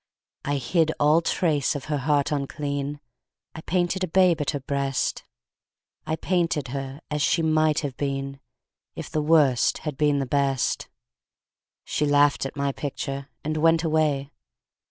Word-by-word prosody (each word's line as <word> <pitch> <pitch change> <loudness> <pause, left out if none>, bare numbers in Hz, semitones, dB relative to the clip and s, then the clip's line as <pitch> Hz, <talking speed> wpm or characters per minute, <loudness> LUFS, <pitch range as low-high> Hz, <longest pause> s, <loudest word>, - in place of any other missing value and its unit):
I 145 0 -1
hid 160 +5 +1
all 150 +3 +4
trace 155 -5 +1
of 145 - -5
her 150 -2 -1
heart 145 +1 +1
unclean; 145 0 -3 0.5
I 160 - -8
painted 180 +2 0
a - - 0
babe 175 -2 +3
at 145 - -1
her 145 - -1
breast; 140 0 -2 0.8
I 160 - 0
painted 170 -5 0
her 135 +2 -5
as 150 0 -1
she 165 +3 +2
might 155 0 +2
have 140 -4 -4
been 135 -1 -3 0.6
If - - -7
the 155 - 0
Worst 150 -5 +3
had 150 -3 -3
been 145 -1 +3
the 135 - 0
Best. 135 0 0 1.0
She 150 - -1
laughed 145 -1 +3
at - - -11
my 140 -1 0
picture 140 0 -5
and 155 +1 -2
went 165 +1 +3
away. 155 -3 +1
145 Hz, 155 wpm, -25 LUFS, 140-160 Hz, 1.0 s, all